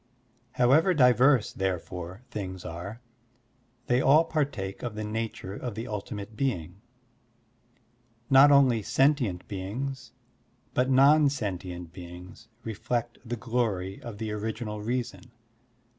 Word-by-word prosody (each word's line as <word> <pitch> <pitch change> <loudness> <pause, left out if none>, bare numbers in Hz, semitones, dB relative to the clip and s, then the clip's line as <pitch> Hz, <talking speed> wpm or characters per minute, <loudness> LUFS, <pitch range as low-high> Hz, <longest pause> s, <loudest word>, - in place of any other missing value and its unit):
However 155 +9 +4
diverse, 125 -2 +4
therefore, 90 +1 -4
things 95 -3 -6
are, 90 +8 -7 0.8
they 125 +1 +2
all 150 +5 +6
partake 140 -12 -2
of 120 -3 -4
the 110 - -4
nature 110 -2 -4
of 120 +1 -5
the 115 +3 -5
ultimate 105 0 -6
being. 100 - -2 1.5
Not 135 +1 +7
only 130 -5 +5
sentient 120 -4 +1
beings, 120 +6 -5 0.6
but 130 +1 +1
non 140 +3 +6
sentient 90 -9 -5
beings, 90 +4 -11 0.2
reflect 115 +2 -3
the 120 0 -4
glory 110 -6 -2
of 115 -3 -8
the 110 0 -4
Original 105 0 -4
Reason. 125 +2 -3
115 Hz, 115 wpm, -28 LUFS, 95-130 Hz, 1.5 s, Not